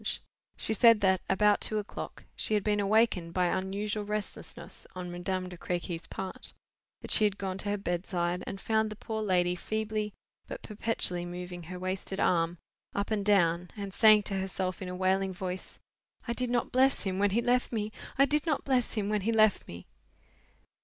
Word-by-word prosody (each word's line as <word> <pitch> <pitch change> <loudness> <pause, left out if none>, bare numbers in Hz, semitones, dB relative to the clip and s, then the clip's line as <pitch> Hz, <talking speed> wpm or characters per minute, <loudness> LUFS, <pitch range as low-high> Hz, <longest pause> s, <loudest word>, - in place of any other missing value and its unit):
She 220 - +3
said 230 0 +6
that, 190 -2 +3
about 205 +2 +4
two 215 - +1
o'clock, 210 -1 -6
she 215 - +1
had 205 - +1
been 210 -1 +1
awakened 200 -5 +2
by 180 -1 +3
unusual 200 +4 -1
restlessness 210 0 -6
on 180 -1 -5
Madame 185 +1 -2
de 180 -1 -10
Crequy's 175 -1 -3
part; 190 -1 -5 0.5
that - - -5
she 215 - +7
had 205 -1 +2
gone 190 -1 -3
to 205 - -3
her 205 - 0
bedside, 175 -1 -2
and 195 - -5
found 220 +1 +1
the 215 - -7
poor 220 +1 -4
lady 180 -3 +2
feebly 215 +2 -2 0.4
but - - -7
perpetually 210 -5 -1
moving 175 0 -6
her 180 +2 -7
wasted 185 +1 -3
arm 170 -1 +2 0.4
up 200 +2 -1
and 210 -2 +1
down—and 190 0 +1
saying 215 -1 +7
to 195 -1 -2
herself 190 -1 -3
in 185 - -4
a 180 - -4
wailing 190 +1 +1
voice: 185 0 -5 0.5
'I 235 - 0
did 250 0 -1
not 240 -1 0
bless 265 +2 +3
him 190 -1 -2
when 205 0 +4
he 210 +4 +1
left 250 +1 +2
me—I 220 +4 0
did 300 +3 0
not 305 -4 +1
bless 255 -3 +1
him 210 -2 -1
when 210 0 0
he 220 +4 0
left 215 -2 +4
me! 85 +1 -9
200 Hz, 185 wpm, -30 LUFS, 180-215 Hz, 0.5 s, she